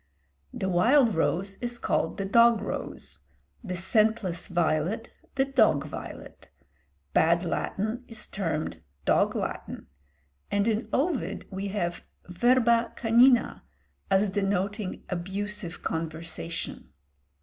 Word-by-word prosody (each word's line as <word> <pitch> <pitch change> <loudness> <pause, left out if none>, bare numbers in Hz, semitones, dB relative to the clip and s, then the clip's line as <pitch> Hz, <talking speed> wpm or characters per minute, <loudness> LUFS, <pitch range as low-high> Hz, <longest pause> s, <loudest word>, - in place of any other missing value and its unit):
The 190 - -3
wild 225 +7 +4
rose 195 +4 0
is 240 0 -3
called - - 0
the 195 - -2
dog 235 +2 +5
rose, 70 - -5 0.4
the 180 - -4
scentless 190 -1 +1
violet 175 +5 0 0.2
the 270 0 +3
dog 220 - +3
violet; 150 - -9 0.6
bad 170 +2 +4
Latin 215 +7 -2
is 220 -2 -5
termed 155 - -3 0.2
dog - - +3
Latin; - - -4 0.6
and 205 +1 +1
in 225 +1 0
Ovid 290 0 -1
we 195 +1 -3
have 175 -4 -2 0.2
verba 235 +5 +3
canina 240 +1 +4 0.5
as 195 +1 +3
denoting 200 0 -1
abusive 190 0 -4
conversation. 165 +1 -4
200 Hz, 105 wpm, -27 LUFS, 175-230 Hz, 0.6 s, dog